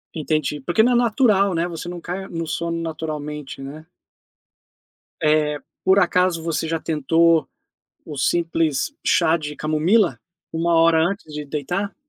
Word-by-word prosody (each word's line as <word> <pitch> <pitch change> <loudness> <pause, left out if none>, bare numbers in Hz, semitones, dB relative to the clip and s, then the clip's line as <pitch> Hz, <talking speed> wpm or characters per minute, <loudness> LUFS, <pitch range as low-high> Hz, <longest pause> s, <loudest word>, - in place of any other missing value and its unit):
Entendi. 155 -2 -1
Porque 175 +9 +2
não 245 - +3
é - - +3
natural, 215 -5 +3
né, 165 +1 0
você 175 0 -6
não 175 0 -6
cai 185 +3 -5
no 165 -1 -4
sono 170 +1 -3
naturalmente, 150 -3 -5
né. 150 +4 -9 1.4
Eh, 150 -1 +2 0.2
por 190 +1 +5
acaso 180 -1 +2
você 165 -1 -2
já 165 0 -1
tentou 165 +2 +2 0.6
o 150 - -8
simples 165 - 0
chá 160 +1 +3
de 150 -2 -6
camomila, 160 +8 +2 0.3
1 170 +1 +1
hora 165 0 +5
antes 175 -2 -2
de 150 0 -4
deitar? 165 +8 -3
165 Hz, 145 wpm, -22 LUFS, 155-175 Hz, 1.4 s, por